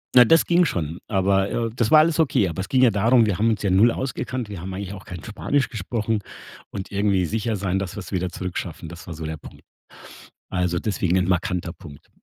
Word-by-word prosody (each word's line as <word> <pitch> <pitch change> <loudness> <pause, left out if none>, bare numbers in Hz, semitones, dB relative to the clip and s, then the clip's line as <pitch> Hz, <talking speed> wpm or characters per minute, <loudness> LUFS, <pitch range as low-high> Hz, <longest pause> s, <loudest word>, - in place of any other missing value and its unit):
Na, 125 -1 +9
das 165 +7 +5
ging 175 +1 +4
schon, 85 - -2
aber 95 0 +2
äh, 115 -1 -1
das 115 -3 +1
war 155 - +7
alles 160 +1 +3
okay, 130 - +3
aber 85 +2 -5
es 95 - -6
ging 130 -1 +3
ja 120 - +6
darum, 115 +4 +4
wir 100 -3 -1
haben 115 +2 +3
uns 110 -2 -1
ja 100 - +1
0 105 +6 +5
ausgekannt. 130 -2 -4
Wir 100 -5 -7
haben 95 +1 -6
eigentlich 95 0 -5
auch 95 -1 -10
kein 90 -4 -8
Spanisch 130 +6 -1
gesprochen 110 0 -2 0.5
und 95 - -7
irgendwie 100 -2 +1
sicher 110 +4 -1
sein, 95 -1 -1
dass 95 -2 -5
wir - - -5
es 95 - -11
wieder 90 -1 -1
zurückschaffen, 90 -2 -5
das 85 +2 -11
war 85 - -6
so 80 +1 -6
der 80 0 -4
Punkt. - - -14 0.9
Also, 90 -1 0
deswegen 95 -3 0
'n 90 -1 +1
markanter 90 -2 -1
Punkt. 70 -2 -14
100 Hz, 230 wpm, -23 LUFS, 90-115 Hz, 0.9 s, Na